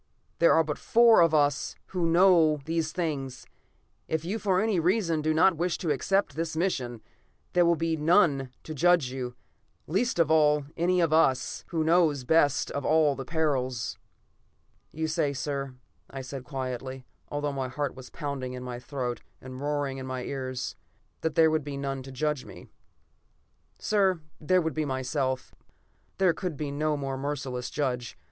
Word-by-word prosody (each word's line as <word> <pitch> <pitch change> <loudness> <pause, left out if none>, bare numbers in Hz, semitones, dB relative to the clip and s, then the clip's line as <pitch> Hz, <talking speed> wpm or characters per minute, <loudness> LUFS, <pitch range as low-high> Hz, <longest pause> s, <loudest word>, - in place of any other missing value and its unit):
There 170 - +6
are 160 - +5
but 150 -2 -4
four 230 -2 +6
of 165 -1 +5
us 145 -2 +1
who 180 -3 0
know 165 -3 +5
these 160 -1 -1
things. 145 -7 -3 0.6
If 160 0 -2
you 205 +6 -2
for 190 -4 +1
any 215 -3 +1
reason 170 -2 +1
do 155 +1 +1
not 165 +2 +4
wish 175 0 0
to 165 - -1
accept 195 +8 0
this 160 0 -3
mission, 125 - -1 0.5
there 175 -1 +4
will 170 - +4
be 165 0 0
none 150 -4 +3
to 155 - -6
judge 170 -3 +3
you, 125 -2 -5 0.5
least 205 - 0
of 165 -2 +3
all, 150 -2 +4
any 175 +2 +1
one 175 - +4
of 160 -2 +1
us, 135 -5 +2
who 165 -2 -1
know 165 0 +4
best 145 -2 +3
of 140 - -3
all 155 -2 +3
the 135 - -6
perils." 130 - -1 0.9
"You 160 +1 -3
say, 155 -3 0
sir," 135 -1 -4 0.3
I 135 - -6
said 130 0 -7
quietly, 130 -1 -5 0.2
although 145 0 -2
my 135 -1 -2
heart 140 +2 -3
was 130 -1 -11
pounding 140 -4 -5
in 125 0 -6
my 125 -1 -6
throat, 125 -2 -4 0.2
and 130 0 -9
roaring 145 -2 -2
in 130 - -6
my 130 -1 -4
ears, 130 -2 -4 0.5
"that 160 - -2
there 160 -1 +5
would 155 -1 0
be 140 -1 -5
none 135 -1 -3
to 135 +1 -10
judge 150 +1 -1
me. - - -12 1.1
"Sir, 195 -4 +2 0.2
there 180 +3 +2
would 160 - -1
be 155 - -1
myself. 130 -1 -2 0.6
There 185 -3 +4
could 175 -5 -4
be 145 -1 -3
no 150 +1 0
more 135 -1 -4
merciless 135 -3 -3
judge. 125 -5 -3
150 Hz, 175 wpm, -28 LUFS, 135-165 Hz, 1.1 s, There